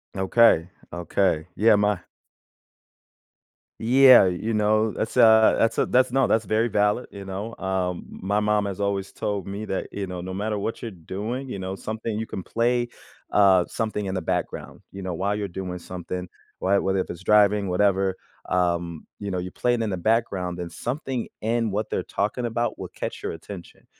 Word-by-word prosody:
Okay, 95 -3 +4 0.2
okay. 85 -1 0
Yeah, 110 +2 +5
my 105 -2 +2 1.8
Yeah, 130 0 +7
you 95 +5 -1
know, 110 +1 +2
that's, 110 +4 -4
a 110 -2 +7
that's 115 - +2
a - - +3
that's 130 0 +3
No, 135 0 +3
that's 110 0 +1
very 110 +4 +1
valid, 105 +2 +1
you 100 - -8
know. 100 +4 -5
Um, 95 -2 -2
my 100 +2 -1
mom 105 -1 +1
has 100 -1 -4
always 100 -1 -1
told 100 -3 -3
me 100 +2 -5
that, 95 - -3
you 100 -1 -3
know, 90 -1 -5
no 95 +1 -6
matter 105 +2 -2
what 105 +3 -3
you're 115 - -4
doing, 105 +8 -5
you 125 - -5
know, 95 0 -4
something 110 +1 -4
you 110 - -2
can 95 - -6
play, 120 +4 0 0.4
uh, 95 -3 +5
something 105 -2 -3
in 95 - -3
the 95 - -1
background, 80 - -3
you 95 0 -8
know, 90 -1 -3
while 100 +4 -1
you're 105 -1 -2
doing 90 0 -5
something, 90 +1 -6 0.3
why 100 +1 +2
whether 95 0 0
if 95 - -2
it's 85 - -9
driving, 105 0 +4
whatever, 95 0 +2 0.3
um, 85 -2 0
you 100 - -4
know, 95 - -2
you're 90 +1 -4
playing 120 -2 0
in 110 - -2
the 95 - -2
background, 95 -3 0
then 85 -1 -6
something 130 -1 -3
in 115 +1 0
what 105 +2 -3
they're - - 0
talking 105 +5 -2
about 120 +1 -2
will - - -5
catch - - -6
your - - -3
attention 85 +2 -11
100 Hz, 190 wpm, -24 LUFS, 95-110 Hz, 1.8 s, Yeah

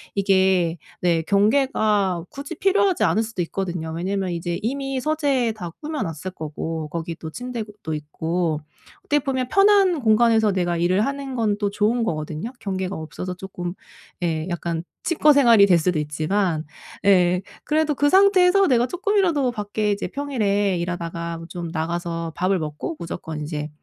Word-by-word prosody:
이게 190 -3 +2 0.2
네 170 -2 +2
경계가 205 - +2
굳이 280 +4 -7
필요하지 390 +1 +2
않을 220 - +3
수도 220 -5 -3
있거든요. 170 -2 -4
왜냐하면 190 +2 -2
이제 170 0 -3
이미 270 +2 -2
서재에 280 -5 +1
다 205 -6 -6
꾸며 305 -1 -4
놨을 165 -1 -4
거고 155 +1 -4
거기도 165 0 -5
침대도 215 -5 -6
있고 160 +1 -2 0.4
어떻게 295 - +2
보면 260 -3 -2
편한 390 -3 +4
공간에서 220 -1 +4
내가 175 -2 0
일을 185 +5 +2
하는 275 -1 -4
건 220 -4 +1
또 205 -1 0
좋은 215 +4 +1
거거든요. 155 +3 -3
경계가 190 -1 -3
없어서 165 +4 -6
쪼끔 180 -2 -6 0.5
예 160 -1 -1
약간 170 -1 -3 0.2
칩거 305 -3 +4
생활이 235 -7 +6
될 180 -3 +5
수도 170 0 +1
있지만 155 +3 -1 0.4
예 180 -2 +4 0.2
그래도 305 -1 +1
그 290 +2 +3
상태에서 385 +1 +5
내가 245 -2 +3
쪼끔이라도 355 -8 +1
밖에 210 -1 -2
이제 205 0 -2
평일에 205 -9 0
일하다가 170 -1 -4
좀 175 -2 -5
나가서 165 0 -3
밥을 185 +1 +1
먹고 150 - -4
무조건 165 -2 -6
이제 150 0 -4
195 Hz, 335 characters per minute, -23 LUFS, 170-255 Hz, 0.5 s, 생활이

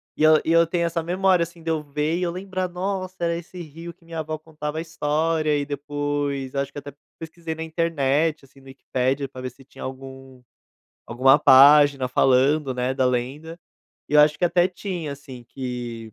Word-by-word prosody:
E - - -1
eu 155 0 +7
e 165 - +1
eu 165 0 +5
tenho 170 0 0
essa 165 0 -1
memória, 180 +1 +2
assim, 170 0 -5
de 165 - -1
eu 155 -1 -1
ver 150 +3 -2
e - - -3
eu 175 - 0
lembrar: 185 0 -4
"Nossa, 185 +1 -4
era 170 0 +1
esse 175 +2 -9
rio 165 +2 -9
que 165 - -27
minha 165 -1 -5
vó 155 0 -5
contava 155 -1 -6
a - - -1
história", 155 -1 0
e 145 - -2
depois, 145 -1 -3
eu 140 - -1
acho 140 0 -3
que - - -12
até 145 -1 -8 0.2
pesquisei 160 0 -7
na 160 - -5
internet, 160 -2 0
assim, 135 0 -21
no 135 - -20
Wikipedia 135 +1 -2
para 130 -1 -10
ver 130 - -4
se 135 +2 -19
tinha - - -12
algum 130 -1 -9 0.7
alguma 135 +4 +4
página 140 0 +6
falando, 135 +3 +2
né, 125 +1 -1
da 130 -1 +1
lenda, 135 +7 -2 0.5
e 150 - -3
eu 150 - +8
acho 150 0 +4
que - - +1
até 175 +1 +3
tinha, 175 -5 -5
assim, 130 -4 -11
que 120 -3 -6
150 Hz, 205 wpm, -23 LUFS, 135-165 Hz, 0.7 s, eu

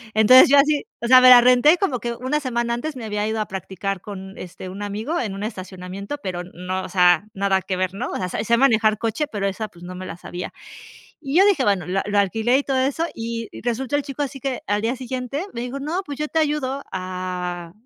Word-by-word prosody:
Entonces, 235 +5 +8
yo 285 - +6
así, 295 +5 +3
o 235 - -4
sea, 255 +1 +8
me 255 - +8
la 245 -1 +10
renté 250 +7 +5
como 295 -11 -1
que 235 0 -3
una 260 +5 -1
semana 235 -4 -1
antes 285 +5 -4
me 240 -3 -7
había 210 0 -2
ido 220 0 -2
a 215 - 0
practicar 190 0 -4
con, 190 -1 -9
este, 185 +1 -8
un 195 +3 -8
amigo 215 +11 -3
en 210 -6 -3
un 200 - -5
estacionamiento, 190 +3 -6
pero 180 -2 -4
no, 180 +1 -5
o - - -7
sea, 180 0 +4
nada 195 -1 +1
que 185 -1 -3
ver, 185 0 -1
¿no? 195 - -4
O - - -3
sea, - - -3
se 235 +2 +2
manejar 220 -4 +3
coche, 230 +7 -1
pero 205 -2 -2
esa, 215 +3 -3
pues, 175 -3 -17
no 180 +1 -7
me 185 +1 -7
la 165 - -7
sabía. 175 0 -7 0.7
Y 280 +1 -3
yo 390 - +7
dije, 385 -10 +3
bueno, 200 -6 +1
lo 190 +2 0
lo 205 0 0
alquilé 225 +6 +2
y 285 - -2
todo 270 -1 0
eso, 275 +5 0
y 230 0 -5
resultó 245 +3 -2
el 290 - +2
chico 280 +1 -5
así 270 0 -7
que 265 -1 -3
al 205 0 0
día 235 +4 -1
siguiente 255 +4 -4
me 235 - -5
dijo: 250 +3 -4
"No, 315 +7 -2
pues, 285 -1 -7
yo 300 - -1
te 320 +1 0
ayudo 285 -3 -1
a, 180 -2 -5
225 Hz, 240 wpm, -22 LUFS, 190-265 Hz, 0.7 s, la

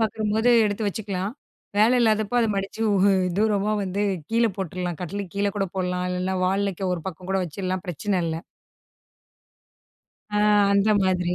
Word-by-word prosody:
பார்க்கும்போது 220 +1 +1 0.2
எடுத்து 205 +1 -2
வச்சுக்கலாம். 200 0 -3 0.5
வேல 220 +4 +5
இல்லாதப்போ, 220 0 +2
அத 225 - +2
மடிச்சு 195 +3 -4
ஊ - - +2 0.4
தூரமா 210 -1 +2
வந்து 195 +2 -2 0.3
கீழ 230 +1 +3
போட்டுரலாம். 180 -2 -3
கட்டிலுக்கு 195 +1 -5
கீழே 200 0 +1
கூட 195 - 0
போடலாம். 180 0 -1
இல்லைன்னா, 185 +1 -1
வாலுலக்க 195 -1 0
ஒரு 170 - -6
பக்கம் 185 +1 -8
கூட 195 - +2
வச்சுறலாம். 185 +3 -4
பிரச்சனை 185 +3 -1
இல்ல. 160 - -2 2.0
ஆ - - +2 0.3
அந்த 200 +2 +3
மாதிரி 180 -1 +1
195 Hz, 145 wpm, -24 LUFS, 180-210 Hz, 2.0 s, வேல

